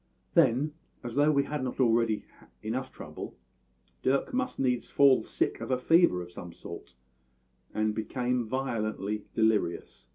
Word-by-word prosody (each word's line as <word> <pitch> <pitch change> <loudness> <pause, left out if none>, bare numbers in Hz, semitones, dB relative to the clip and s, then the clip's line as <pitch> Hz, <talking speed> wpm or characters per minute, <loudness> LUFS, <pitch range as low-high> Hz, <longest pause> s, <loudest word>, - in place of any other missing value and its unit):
"Then, 140 +6 +3 0.3
as 120 -1 -5
though 145 +3 +4
we 140 -2 +3
had 145 -1 -3
not 130 - -4
already 115 -3 +2 0.4
enough 125 +5 -3
trouble, - - -8 0.7
Dirk 140 - +1
must 260 0 -1
needs 125 -2 0
fall 140 -2 +5
sick - - -2
of - - -5
a 130 - +2
fever 145 - +4
of 85 - -12
some 90 -1 -9
sort, 85 -4 -10 0.8
and 110 0 0
became 125 +3 -1
violently 110 -5 -2
delirious. 105 - 0
125 Hz, 140 wpm, -29 LUFS, 110-135 Hz, 0.8 s, fall